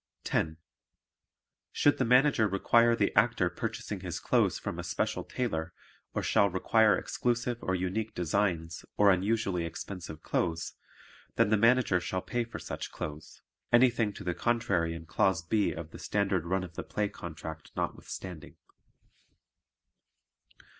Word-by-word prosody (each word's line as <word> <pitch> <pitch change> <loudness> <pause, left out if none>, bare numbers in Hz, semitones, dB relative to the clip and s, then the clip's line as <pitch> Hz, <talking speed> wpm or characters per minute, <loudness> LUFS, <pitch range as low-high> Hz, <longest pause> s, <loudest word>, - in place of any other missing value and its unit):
10. 80 0 0 1.1
Should 145 - +3
the 130 - +2
Manager 125 -1 +4
require 115 +4 +4
the 100 -3 0
Actor 105 -4 +3
purchasing - - -4
his - - -5
clothes - - +2
from - - -5
a - - -3
special - - -1
tailor 85 -9 -3 0.4
or - - -1
shall 100 - +3
require 105 +2 +3
exclusive 120 0 -1
or 95 - 0
unique 95 +5 -2
designs 85 -2 -1
or 100 -1 +6
unusually 95 -1 +1
expensive 85 0 -7
clothes, 80 -2 -1 0.6
then 105 - +3
the - - +6
Manager 115 -3 +4
shall 90 +1 -3
pay 120 -1 -1
for 115 - -8
such - - -6
clothes, 75 +1 -7 0.3
anything 120 -3 +4
to - - -9
the 90 - -1
contrary 95 -8 0
in 85 0 -9
Clause 85 +1 +1
B 105 +3 +1
of 80 -1 -7
the - - -10
Standard 95 -4 0
Run 95 +1 0
of 90 -2 -8
the - - -4
Play 105 -1 -1
Contract 80 -3 -8
notwithstanding. 90 -5 -5
95 Hz, 140 wpm, -30 LUFS, 85-115 Hz, 1.1 s, or